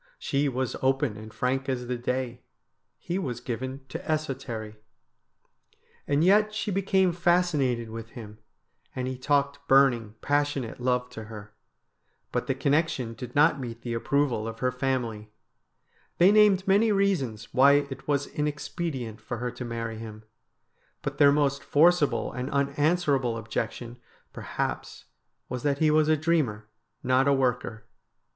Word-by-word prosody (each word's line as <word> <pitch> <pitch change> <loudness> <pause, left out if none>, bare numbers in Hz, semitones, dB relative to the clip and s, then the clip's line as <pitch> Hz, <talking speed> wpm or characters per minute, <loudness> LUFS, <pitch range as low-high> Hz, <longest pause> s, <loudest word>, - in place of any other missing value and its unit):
She 140 +1 0
was 130 -1 -2
open 135 -3 +1
and 110 +1 -10
frank 130 +5 -1
as 125 -2 -2
the 125 +1 -2
day, 125 0 -3 0.6
he 180 +3 -3
was 125 -11 -3
given 130 +2 -5
to - - -5
esotery. 135 -8 -4 1.3
And 145 +2 +2
yet 210 +3 +4
she 215 -1 -2
became 190 -1 +2
fascinated 155 -10 +1
with 115 0 -7
him, 105 -2 -10 0.6
and 130 0 -2
he 130 - -3
talked 140 +2 0
burning, 125 -6 +4
passionate 145 -4 -1
love 125 0 0
to 110 -2 -8
her. 105 -1 -10 0.8
But - - -2
the 135 - 0
connection 140 -3 0
did 125 +1 -9
not 150 0 +4
meet 120 -2 -7
the 120 - -3
approval 120 -2 0
of 115 0 -6
her 125 +2 0
family. 125 -5 -2 0.9
They 180 +3 +6
named 205 -3 +5
many 210 +3 +4
reasons 150 - 0
why 140 +2 +6
it 140 -2 -1
was 145 -1 +1
inexpedient 145 - -4
for 120 +2 -5
her 125 +1 -3
to 125 +1 -7
marry 115 -2 -4
him, 110 -1 -9 0.8
but - - -4
their 140 -1 +7
most 140 -1 +1
forcible 160 0 +3
and 125 +2 -4
unanswerable 140 -3 +1
objection 115 +2 -4 0.4
per - - -8
haps - - -4 0.4
was 125 -1 -4
that 140 0 0
he 155 +1 +3
was 155 0 +3
a 155 - +4
dreamer, 145 -10 0 0.4
not 130 +2 +3
a 140 - +5
worker. 125 -4 -1
130 Hz, 150 wpm, -27 LUFS, 120-150 Hz, 1.3 s, their